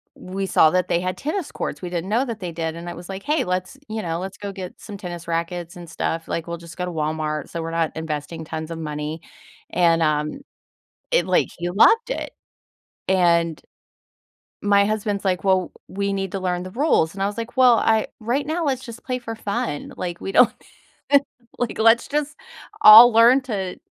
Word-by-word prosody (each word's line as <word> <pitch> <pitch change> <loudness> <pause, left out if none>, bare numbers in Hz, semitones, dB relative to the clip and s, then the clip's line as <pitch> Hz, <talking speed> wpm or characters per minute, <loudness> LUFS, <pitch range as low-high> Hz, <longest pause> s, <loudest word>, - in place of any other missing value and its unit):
we 195 +1 -5
saw 155 -3 +5
that 185 -1 +1
they 170 - +2
had 185 0 -2
tennis 315 +3 -3
courts, - - -4
we 180 - -5
didn't 175 +2 -3
know 235 +5 +2
that 230 -4 -5
they 180 -2 -4
did, 160 -1 -3
and 170 +1 -7
I - - -5
was 175 +1 -10
like, 195 0 -5
"Hey, 300 +2 +1
let's" 185 +7 -3
you 220 0 -3
know, 165 -2 -3
"Let's 190 +1 -6
go 205 -1 -6
get 185 -2 -8
some 205 -2 -8
tennis 175 -3 -7
rackets 170 +1 -3
and 175 -1 -10
stuff." 165 0 -3
Like, 165 0 -3
we'll 170 - -4
just 170 -1 -12
go 180 - -2
to 180 - -5
Walmart 155 -1 -2
so 170 - -5
we're 165 - -4
not 165 -1 0
investing 160 0 -5
tons 160 +1 -6
of 165 - -5
money, 150 +1 -5 0.5
and, 170 -2 +3
um, 150 - -1 0.7
it - - +3
like - - +2
he 175 0 -3
loved 440 - +4
it! - - -4 0.8
And 170 -3 +2 1.0
my 200 0 +4
husband's 210 -2 -2
like, 185 -1 0
"Well, 190 -2 +2 0.2
we 200 +1 -2
need 195 -1 -3
to 195 - -3
learn 180 -1 -2
the 185 - -7
rules." 240 - +2
And 195 - -4
I - - +2
was 205 +2 -5
like, 230 +2 -6
"Well, 250 -2 +6
I 220 -1 +2
right 245 +6 -1
now, 325 +2 -1
let's 265 -2 -1
just 235 -1 -10
play 255 -1 -2
for 225 -2 -6
fun. 205 -8 -3
Like, 175 -1 -5
we 195 - -5
don't 250 - +6 1.1
like, 245 -2 -2
let's 225 +1 +4
just 300 0 -2 0.5
all 225 +3 +11
learn 235 +4 +6
to, 200 -7 -4
185 Hz, 205 wpm, -22 LUFS, 170-220 Hz, 1.1 s, all